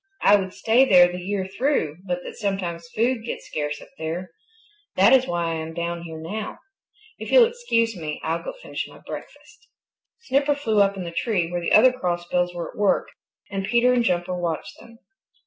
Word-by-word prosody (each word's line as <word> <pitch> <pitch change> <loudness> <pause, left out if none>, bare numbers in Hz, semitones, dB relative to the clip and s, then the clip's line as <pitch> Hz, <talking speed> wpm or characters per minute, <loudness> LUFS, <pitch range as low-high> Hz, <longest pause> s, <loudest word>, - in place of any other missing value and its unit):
I 205 - +7
would 190 -2 -1
stay 230 +6 +3
there 180 -8 +6
the 180 - -5
year 190 +1 -2
through 195 - 0
but 180 0 -2
that - - -8
sometimes 180 -5 -3
food 235 +1 +1
gets 235 - -6
scarce 150 -1 -3
up - - -17
there. 165 +3 -4 0.6
That 195 +7 +6
is 260 -1 +5
why 170 -1 -1
I 165 - -2
am 160 0 -6
down 170 0 -3
here 160 -2 -8
now. 205 +7 -5 0.6
If - - -6
you'll - - +8
excuse 340 - 0
me, 155 -4 -5
I'll 165 +1 -1
go - - -5
finish - - -4
my - - -14
breakfast." 470 +1 -10 0.5
Snipper 280 - +1
flew 220 -8 +1
up 200 0 +2
in 185 - -4
the 170 - -6
tree 175 -2 -1
where 175 0 -2
the 170 - -2
other 250 +4 +7
Crossbills 180 -4 -1
were 170 - -5
at - - -18
work 205 -1 +2 0.4
and 195 -1 -2
Peter 240 +3 +4
and 245 -1 +2
Jumper 180 -3 0
watched 170 -3 -3
them. 230 0 -15
190 Hz, 200 wpm, -24 LUFS, 170-230 Hz, 0.6 s, you'll